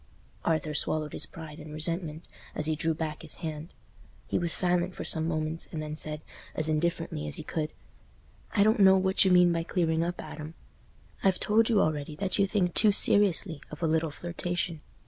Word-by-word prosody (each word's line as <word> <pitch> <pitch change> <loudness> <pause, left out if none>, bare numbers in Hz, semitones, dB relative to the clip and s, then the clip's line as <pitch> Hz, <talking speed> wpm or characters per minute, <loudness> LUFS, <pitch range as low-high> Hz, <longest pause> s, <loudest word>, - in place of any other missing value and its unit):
Arthur 155 -2 -1
swallowed 155 0 -1
his - - -1
pride 160 -1 -10
and 155 0 -10
resentment 160 +1 +1 0.3
as 150 - -3
he 155 0 0
drew 160 +1 -1
back 155 -1 -5
his 160 - -2
hand. 155 +2 -7 0.5
He - - -1
was 170 -1 +1
silent 180 +1 +5
for - - -6
some 160 0 +2
moments, 155 0 -3
and 160 - -5
then 155 0 -5
said, 155 -1 -2 0.3
as 155 - +2
indifferently 160 - -2
as 75 - -5
he - - -6
could, 155 -2 -4 0.8
"I 200 - +3
don't 215 +1 +2
know 190 -1 +6
what 190 0 +2
you 190 - +2
mean 180 -1 +5
by 165 - -1
clearing 165 -1 0
up, 175 +1 -4
Adam. 155 +1 -8 0.7
I've 190 -1 +2
told 220 +2 +2
you 220 -3 +3
already 150 -3 -1
that 190 +5 0
you 200 - +3
think 185 -4 0
too 215 - +4
seriously 195 -5 +3
of 150 +2 -9
a - - +2
little 160 0 0
flirtation. 175 0 -4
165 Hz, 195 wpm, -28 LUFS, 155-180 Hz, 0.8 s, know